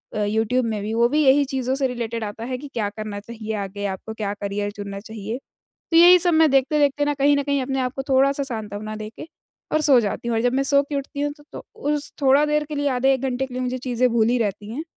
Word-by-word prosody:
अ, 210 - 0
YouTube 225 +4 +1
में 220 -2 -2
भी, 215 +2 -3
वो 235 +1 +4
भी 300 +3 +2
यही 280 +1 +5
चीज़ों 260 -1 -2
से 270 -1 +1
रिलेटेड 235 -2 -4
आता 210 +2 -6
है 255 +1 -3
कि 290 +3 -9
क्या 210 -3 -1
करना 210 0 -6
चाहिए 220 +1 -7
आगे 200 +1 -6
आपको, 195 +3 -5
क्या 210 -2 -3
करियर 205 0 -2
चुनना 200 -1 -7
चाहिए। 220 +1 -6 0.5
तो 330 - +2
यही 350 +2 +9
सब 350 0 +2
मैं 315 -1 +5
देखते-देखते 285 +1 +2
ना 290 0 0
कहीं 285 +1 +3
न 285 - +1
कहीं 280 -1 0
अपने 270 +1 -2
आप 250 -1 -1
को 270 - -2
थोड़ा-सा 275 +1 +3
सांत्वना 215 -4 -5
देके 215 +6 -8 0.5
और 310 - +3
सो 285 -4 +5
जाती 220 +2 -3
हूँ। 235 - 0
और - - +1
जब 245 0 +2
मैं 270 +1 +1
सो 280 +1 +4
के 285 +1 -7
उठती 280 +1 -5
हूँ, 290 0 -1
तो 295 0 -19
तो - - -8
उस 295 -8 -2
थोड़ा 275 +1 +5
देर 300 0 +1
के 300 +1 -7
लिए, 285 0 0
आधे-1 265 0 +1
घंटे 265 0 -1
के 255 - -11
लिए 255 - -2
मुझे 250 0 -2
चीज़ें 250 0 +1
भूली 235 +1 +3
रहती 205 -2 -2
हैं 265 +7 -4
255 Hz, 255 wpm, -22 LUFS, 220-280 Hz, 0.5 s, यही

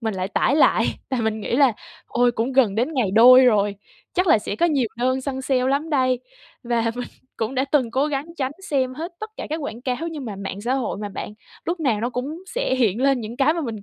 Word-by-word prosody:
mình 220 -3 -2
lại 185 0 -3
tải 270 +7 +1
lại, - - +4 0.2
tại 260 -3 -1
mình 220 0 -1
nghĩ 235 - -1
là 275 -4 +5 0.3
"Ôi! 245 0 +2
Cũng 235 +3 -2
gần 245 -7 +3
đến 245 +8 0
ngày 240 -8 +1
đôi 250 +5 +8
rồi, 205 -4 +3 0.4
chắc 365 +1 +1
là 310 - +5
sẽ 210 0 -5
có 345 - +3
nhiều 280 -8 +1
đơn 255 +2 0
săn 265 0 -4
sale 255 -1 +1
lắm 285 +4 0
đây!" 255 -4 +2 0.4
Và 235 -1 0
mình 245 0 -5 0.3
cũng 225 +4 -3
đã 260 - +1
từng 275 -4 +1
cố 270 +5 +1
gắng 285 0 -2
tránh 265 -1 -2 0.2
xem 260 -3 0
hết 330 +5 -6
tất 435 0 -6
cả - - -5
các 315 - -1
quảng 275 -7 -6
cáo, 250 -2 -1
nhưng 300 -5 -6
mà 210 -4 -6
mạng 195 0 -6
xã 245 +5 0
hội 260 -4 -2
mà 210 - -4
bạn 205 +1 -7 0.3
lúc 340 0 -2
nào 235 -8 +1
nó 240 +2 -1
cũng 285 +8 -5
sẽ - - -1
hiện 235 -2 +1
lên 275 -2 +3
những 230 +2 -7
cái 290 +4 +3
mà 335 - -2
mình 225 -8 -5
255 Hz, 250 wpm, -22 LUFS, 225-280 Hz, 0.4 s, đôi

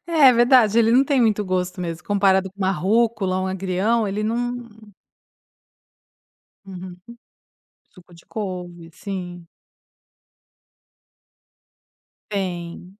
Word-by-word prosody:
É, 305 -6 +6
verdade 240 -2 +4
ele 225 -1 +4
não 255 +3 +5
tem 275 -1 +1
muito 215 -3 +2
gosto 180 -1 -2
mesmo. 170 -1 -5
Comparado 195 -2 +2
com 195 - -32
uma 190 -1 +1
rúcula 195 +1 +1
ou 185 - -2
um - - -2
agrião, 190 +4 0
ele 205 +2 -3
não 240 +2 -3 2.0
Uhum. 185 -2 -9 0.9
Suco 180 -2 -19
de 170 - -18
couve. 180 -5 -6
Sim. 180 -3 -7 2.8
Tem. 180 -1 -5
195 Hz, 105 wpm, -22 LUFS, 180-225 Hz, 2.8 s, É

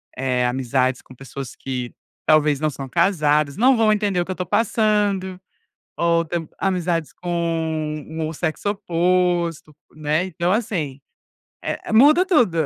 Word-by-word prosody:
eh, 125 -1 0
amizades 130 0 0
com - - -16
pessoas 135 0 -8
que 125 -2 -5 0.3
talvez 150 -2 +4
não 155 +1 +1
são 135 -2 -7
casadas. 150 -3 +2
Não 255 +4 +5
vão 225 -2 +3
entender 205 -4 +1
o - - -2
que 190 - -5
eu - - 0
estou 180 0 -4
passando 205 -4 +1 0.5
ou 170 0 +2
tamb 165 0 -4
amizades 175 -4 -1
com 160 -3 -2
o 155 -1 -1
um - - -6
sexo 160 +5 -2
oposto, 175 -4 0 0.2
né? 155 +2 0
Então, 175 -1 -1
assim, 175 - -2 0.6
eh, - - -5
muda 300 +10 +6
tudo. 245 - +3
170 Hz, 145 wpm, -21 LUFS, 150-190 Hz, 0.6 s, muda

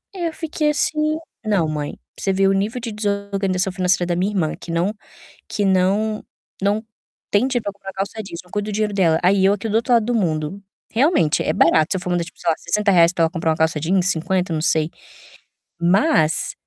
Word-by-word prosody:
aí 350 - -3
eu 330 - -2
fiquei 310 -2 -1
assim, 305 +1 +1 0.3
"Não, 200 -7 +2
mãe", 150 -1 -3 0.2
pra - - -9
você 195 - +1
ver 195 0 +3
o 195 - +3
nível 215 +5 -1
de 230 - -4
desorganização 200 -2 -1
financeira 180 -1 +1
da 175 - 0
minha 185 +4 0
irmã 170 -6 0
que 170 - -8
não 175 +5 0 0.6
que 205 - -1
não 195 +3 +1 0.4
não 205 +3 +1 0.5
tem 235 +6 +3
tipo 235 -6 -1
uma 195 -1 -10
calça 195 +3 -4
jeans, 175 -4 -8
não 180 - -21
cuida 205 0 -3
do - - -5
dinheiro 210 0 0
dela, 170 -5 +3
aí 190 +2 +3
eu 200 - +4
aqui 205 +2 -5
do 215 - 0
outro 235 +2 +1
lado 230 -2 +3
do 245 +2 -1
mundo. 160 -2 -1 0.3
Realmente, 245 - +2
é 155 - +1
barato, 160 -2 +4
se - - +1
eu 185 - -3
for 180 - -5
manda, 175 -1 0
tipo, 170 - -14
sei 170 - 0
lá, 160 - +1
R$60 185 -5 +3
pra 175 - 0
ela 165 - +3
comprar 165 -2 -1
uma - - -3
calça 160 -1 +1
jeans, 180 +3 +1
50, 180 +1 -1
não 155 - -1
sei. 155 0 +1 0.9
Mas 175 - +2
195 Hz, 220 wpm, -21 LUFS, 170-210 Hz, 0.9 s, eu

